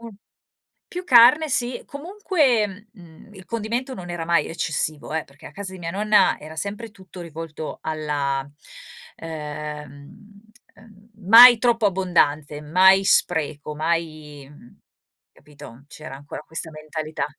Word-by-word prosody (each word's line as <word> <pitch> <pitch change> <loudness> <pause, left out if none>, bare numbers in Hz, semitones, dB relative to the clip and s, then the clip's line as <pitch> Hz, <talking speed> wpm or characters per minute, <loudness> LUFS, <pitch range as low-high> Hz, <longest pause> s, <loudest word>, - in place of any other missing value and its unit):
un 230 0 -10 0.8
più 360 +1 -7
carne. 260 +3 +6
Sì. 245 -1 -1
Comunque, 280 - -1
mhmm, 175 0 -17
il 190 -2 -14
condimento 235 +3 -4
non 175 -4 -9
era 170 -2 -5
mai 170 0 +2
eccessivo 155 -1 -3
eh, 160 - -2
perché 140 0 -17
a - - -12
casa 190 +2 -6
di 185 - -10
mia 165 -1 -5
nonna 210 +3 +2
era 155 +1 -11
sempre 205 +5 -5
tutto 185 -2 -13
rivolto 160 -1 -8
alla 145 -3 -3 0.7
ehm, 150 +5 -9 0.3
ehm, 215 0 -20 0.2
mai 240 +2 +10
troppo 230 -2 +2
abbondanze, 155 -6 0
mai 190 +5 +4
spreco, 150 -3 0
mai 155 -3 -4
mhmm, 145 -5 -18 0.5
capito, 140 -3 -15
c'era 150 -3 -10
ancora 145 +1 -10
questa 160 +1 -6
mentalità. 155 -1 -5
170 Hz, 130 wpm, -22 LUFS, 150-210 Hz, 0.8 s, mai